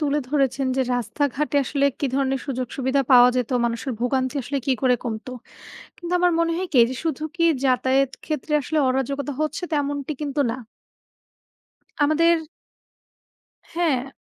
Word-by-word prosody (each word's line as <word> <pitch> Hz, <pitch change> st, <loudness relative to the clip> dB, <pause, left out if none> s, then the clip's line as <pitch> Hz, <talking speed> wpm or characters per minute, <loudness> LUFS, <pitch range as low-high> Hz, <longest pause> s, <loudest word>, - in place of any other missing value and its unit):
তুলে 295 Hz, -1 st, +1 dB
ধরেছেন 270 Hz, -2 st, +1 dB
যে, 265 Hz, -, +2 dB, 0.2 s
"রাস্তাঘাটে 285 Hz, +5 st, -1 dB
আসলে 280 Hz, +1 st, +1 dB
কি 280 Hz, -, 0 dB
ধরনের 270 Hz, -1 st, 0 dB
সুযোগ 255 Hz, -3 st, -2 dB
সুবিধা 265 Hz, +1 st, +1 dB
পাওয়া 245 Hz, 0 st, +8 dB
যেত? 250 Hz, 0 st, -1 dB
মানুষের 235 Hz, +2 st, -2 dB
ভোগান্তি 260 Hz, +2 st, 0 dB
আসলে 275 Hz, +4 st, -2 dB
কি 270 Hz, -, +3 dB
করে 255 Hz, -1 st, +4 dB
কমতো?" 225 Hz, +2 st, -5 dB, 0.7 s
কিন্তু 345 Hz, 0 st, -7 dB
আমার 355 Hz, 0 st, +3 dB
মনে 335 Hz, 0 st, +2 dB
হয় 370 Hz, +1 st, -2 dB
কি? -, -, -4 dB
এই 230 Hz, -, +1 dB
যে -, -, -5 dB
শুধু 310 Hz, -1 st, -2 dB
কি 335 Hz, -, 0 dB, 0.2 s
যাতায়াত 260 Hz, +1 st, +2 dB
ক্ষেত্রে 305 Hz, 0 st, -3 dB
আসলে 310 Hz, +3 st, -1 dB
অরাজকতা 275 Hz, +2 st, -1 dB
হচ্ছে 310 Hz, +3 st, -2 dB
তেমনটি 285 Hz, 0 st, -1 dB
কিন্তু 290 Hz, -1 st, -1 dB
না। 230 Hz, -, -3 dB, 1.5 s
আমাদের 335 Hz, +3 st, +4 dB, 1.4 s
হ্যাঁ। 280 Hz, -7 st, 0 dB
275 Hz, 150 wpm, -23 LUFS, 260-300 Hz, 1.5 s, পাওয়া